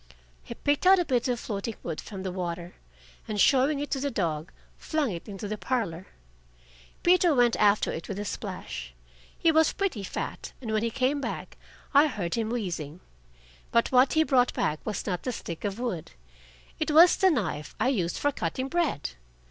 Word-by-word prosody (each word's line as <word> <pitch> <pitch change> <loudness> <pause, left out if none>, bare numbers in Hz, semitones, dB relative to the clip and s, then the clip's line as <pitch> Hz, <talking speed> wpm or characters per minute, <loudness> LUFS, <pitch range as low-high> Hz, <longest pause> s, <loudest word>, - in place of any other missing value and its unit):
He - - -8
picked 290 +5 +1
out 385 +1 +8
a 355 - +1
bit 250 -4 +1
of 245 -2 0
floating 215 0 -4
wood 165 -3 -4
from 195 -3 -8
the 190 - -3
water, 175 -1 -4 0.5
and 210 -1 -3
showing 275 +6 +4
it 290 - -4
to 270 - 0
the 285 +1 -1
dog, 170 - -2 0.3
flung 305 -7 -1
it 175 +4 -7
into 200 +1 -6
the 210 0 -4
parlor. 190 -9 -2 1.0
Peter 350 -3 +5
went 240 -2 +4
after 210 0 +3
it 165 - -6
with 195 - -5
a 205 - -3
splash. - - -6 0.4
He 330 - +4
was 320 0 +4
pretty 380 - -1
fat, - - -5
and 230 -4 -5
when 215 - +2
he 230 - 0
came 270 +4 0
back - - -5 0.4
I 290 +2 +7
heard 200 - -3
him 225 -1 -1
wheezing. 175 -9 -4 0.7
But 235 - +2
what 255 +1 +5
he 315 - +4
brought 255 -5 +2
back 155 0 -1
was 215 - -3
not 180 -4 -2
the 255 - -2
stick 170 -8 -6
of 205 +1 -3
wood. 220 - -4 0.7
It 310 - 0
was 330 +3 +7
the 380 - +4
knife 180 - -2
I 255 - +3
use 180 -10 0
for 290 - +1
cutting 260 +5 -3
bread. 315 - 0
230 Hz, 190 wpm, -27 LUFS, 180-280 Hz, 1.0 s, out